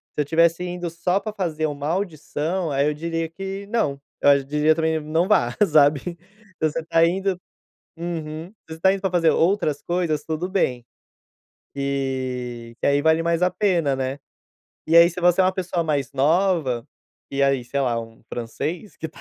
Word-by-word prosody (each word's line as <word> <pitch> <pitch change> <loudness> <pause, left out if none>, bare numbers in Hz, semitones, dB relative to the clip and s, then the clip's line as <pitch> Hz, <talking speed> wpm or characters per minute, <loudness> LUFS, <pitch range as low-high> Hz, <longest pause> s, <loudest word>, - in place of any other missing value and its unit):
Se - - +1
eu - - -1
tivesse 165 +3 +3
indo 175 -1 -4
só 180 +3 0
para 210 +2 -6
fazer 165 -6 -2
uma 145 -1 -4
audição, 170 -1 -2
aí 140 +1 +2
eu 150 - +1
diria 165 +1 -3
que 195 +3 -6
não, 205 -11 0 0.2
eu 140 -1 +5
diria 150 +3 +2
também 160 0 0
não 160 +4 0
vá, 210 - +2
sabe? 150 +2 +3 0.4
Então 155 - +1
você 165 - -3
tá 165 0 +4
indo 190 +2 0 0.6
uhum, 165 -1 -5
se 210 - -25
você 160 - -6
está 190 +4 +3
indo 195 - -4
para 190 -2 -1
fazer 170 -3 +3
outras 160 -5 +1
coisas, 170 -4 -1
tudo 160 +3 -3
bem. 125 -11 0 0.9
E 130 -4 -3
que - - 0
aí 140 0 +3
vale 160 +1 +3
mais 170 +1 0
a 180 - +4
pena, 175 -8 +1
né. 135 +1 -3 0.7
E 165 - +3
aí, 170 +1 +9
se - - -7
você 180 +1 +4
é - - +4
uma 185 - +3
pessoa 180 -2 -2
mais 145 -4 -1
nova, 150 -4 +1 0.4
e 140 0 0
aí 135 -2 +2
sei 140 +3 -1
lá, 120 -3 0
um 115 0 -11
francês 155 - -4
que 160 - -5
tá - - -17
160 Hz, 185 wpm, -23 LUFS, 140-180 Hz, 0.9 s, aí